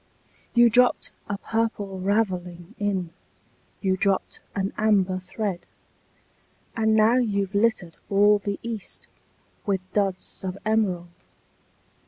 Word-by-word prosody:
You 240 0 +7
dropped 245 +2 +3 0.2
a 200 - -1
Purple 210 -3 -2
Ravelling 185 -4 -1
in 190 -5 -1 0.7
You 190 -2 +2
dropped 195 -1 0
an 195 0 -1
Amber 195 -4 +2
thread 190 0 -4 1.1
And 220 -1 +2
now 220 +3 +5
you've 200 -5 0
littered 200 -5 +1
all 205 +1 +5
the 200 0 -3
east 230 -3 -4 0.6
With 195 -2 +1
Duds 195 -3 0
of 190 0 -4
Emerald! 185 -6 -1
200 Hz, 110 wpm, -25 LUFS, 185-220 Hz, 1.1 s, You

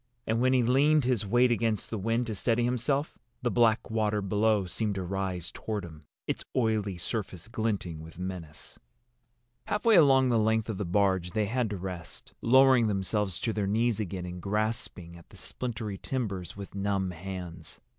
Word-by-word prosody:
And 115 +1 0
when 130 +1 +4
he 125 -2 +4
leaned 140 +5 +4
his 120 -5 +1
weight 120 +4 +4
against 115 -3 0
the 110 - -2
wind, 115 +4 0
to 115 - -3
steady 115 +4 +1
himself, 125 +5 0 0.2
the 120 - +1
black 115 -2 +3
water 105 -1 +1
below 105 +1 +2
seemed 100 +4 -2
to 95 - -2
rise 95 -2 -3
toward 105 -4 -4
him, 80 -3 -11 0.2
its - - -2
oily 110 -6 +1
surface 95 -1 -4
glinting 110 -8 -2
with 80 +1 -11
menace. 90 -4 -7 0.9
Halfway 215 +1 +3
along 135 -6 +6
the 115 -2 +3
length 110 +1 +1
of 105 - -3
the 100 - -1
barge 95 -1 +1
they 110 -1 +1
had 120 +2 0
to 100 - -3
rest, 90 -3 -8
lowering 130 -1 +6
themselves 95 -2 -1
to 115 - -1
their 105 -2 -1
knees 115 +2 +1
again 95 -3 -3
and 90 0 -7
grasping 105 -4 -2
at 85 - -17
the - - -15
splintery 110 -5 -4
timbers 100 -9 -3
with 100 -1 -8
numb 100 -1 -1
hands. 90 -2 -8
105 Hz, 175 wpm, -29 LUFS, 95-115 Hz, 0.9 s, along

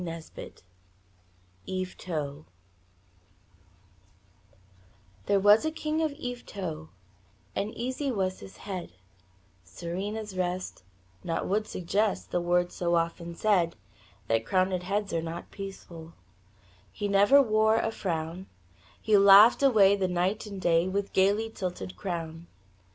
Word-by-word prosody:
YVETOT 160 -6 -4 2.8
There 200 - +3
was 205 +2 +6
a 315 - +1
king 315 0 -2
of 315 -2 +1
Yvetot, 200 - -6 0.7
And 205 +2 -2
easy 260 +3 -2
was 190 -4 -2
his 195 - -12
head, 185 - -6 0.7
Serene 185 - -5
his 210 -3 -6
rest 185 - -3 0.4
naught 165 -2 -2
would 210 +2 0
suggest 200 +4 -1
The 175 - 0
words 175 0 +1
so 175 -1 0
often 170 0 -2
said, 180 -4 +2 0.5
That 115 0 +1
crowned 185 +7 +1
heads 200 +2 -2
are 165 - 0
not 165 +1 -7
peaceful; 175 -4 -9 0.8
He 205 - -3
never 200 +7 +5
wore 220 -3 +3
a 225 0 0
frown 170 -2 -4 0.5
He 215 - +2
laughed 200 +5 +8
away 210 -8 +5
the 195 -2 0
night 185 +4 -1
and 200 -2 -7
day. 170 -1 +2
With 200 +1 -2
gayly 205 +4 +2
tilted 175 - -5
crown. 165 - -5
190 Hz, 120 wpm, -28 LUFS, 170-210 Hz, 2.8 s, laughed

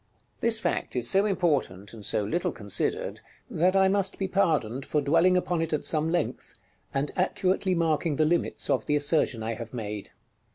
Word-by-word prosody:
§ - - -40
LIV. - - -40
This 230 -1 +4
fact - - -2
is 120 -1 0
so 195 +7 +3
important, 140 - -1
and 110 -2 -10
so 105 - 0
little 170 +12 -1
considered, 105 -4 -2 0.3
that 185 +4 +2
I 190 0 +5
must 195 0 +1
be 195 - -1
pardoned 155 - 0
for 150 - 0
dwelling 165 +6 +3
upon 175 -2 0
it 165 -1 -2
at 150 - -1
some 155 0 +1
length, 170 -1 -2 0.4
and 140 +1 -1
accurately 185 0 +1
marking 160 -2 +1
the 155 - +2
limits 170 +2 0
of - - 0
the 150 - +2
assertion 145 -5 +1
I 115 +1 -2
have 115 +2 -8
made. 105 -3 -5
155 Hz, 195 wpm, -27 LUFS, 125-185 Hz, 0.4 s, I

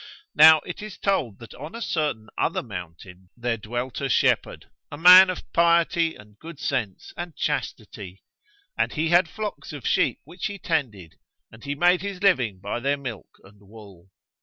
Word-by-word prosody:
Now 155 0 +8
it 180 - -8
is 210 -1 -9
told 135 - -1
that 115 - -11
on 150 - -10
a - - -6
certain 145 -9 -2
other - - -1
mountain 90 +1 -10
there 120 -1 -1
dwelt 120 +4 -5
a 135 - -2
shepherd, - - +1 0.3
a 145 - -7
man 180 +3 +9
of 185 - -4
piety 170 -1 +2
and 105 0 -17
good 165 -2 -11
sense 120 -11 -4
and 175 -3 -7
chastity; 105 -9 -5 0.5
and - - 0
he 160 +2 -1
had 175 0 +4
flocks 210 -6 -6
of 145 -4 -9
sheep - - +1
which 170 +7 -6
he 205 -1 -7
tended, 125 - -4 0.3
and 110 +5 -15
he 140 0 -3
made 175 +4 +3
his 200 -1 -6
living 130 - +2
by 100 +5 -4
their 140 +3 0
milk 130 -6 -8
and 100 +1 -19
wool. 100 -3 -16
140 Hz, 175 wpm, -24 LUFS, 105-170 Hz, 0.5 s, man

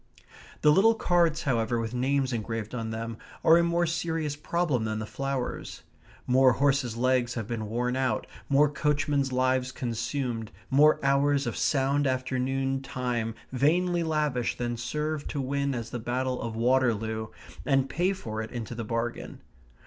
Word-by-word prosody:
The 150 - +6
little 220 +8 +5
cards, 170 -6 +2
however, 120 -3 +1
with 115 0 -3
names 130 +1 +1
engraved 115 -1 -4
on 115 -2 -3
them, 115 0 -4 0.3
are 165 +1 +7
a 170 - +4
more 170 0 +2
serious 165 -3 -2
problem 150 -4 0
than 110 -1 -2
the 110 - -3
flowers. 135 +1 -4 0.4
More 130 0 +5
horses' 135 -4 +1
legs 125 0 +1
have 115 -3 -3
been 110 -3 -4
worn 125 +2 -1
out, 130 -5 0 0.2
more 140 +2 +5
coachmen's 145 -1 0
lives 130 0 +1
consumed, 120 -1 -3 0.2
more 150 +3 +5
hours 140 0 +3
of 120 - -3
sound 140 0 +1
afternoon 130 +1 -1
time 125 -4 -2 0.2
vainly 170 +7 +2
lavished 150 -7 0
than 120 -1 -2
served 150 +5 -3
to 145 - -3
win 140 +1 -1
us 115 -1 -5
the 120 - -3
battle 125 +2 -2
of 115 -1 -4
Waterloo, 115 -3 +1 0.4
and 135 -2 +2
pay 175 +7 +1
for 110 - -4
it 110 - -6
into 120 -1 -5
the 115 0 -4
bargain. 115 +2 -3
130 Hz, 155 wpm, -28 LUFS, 120-145 Hz, 0.4 s, are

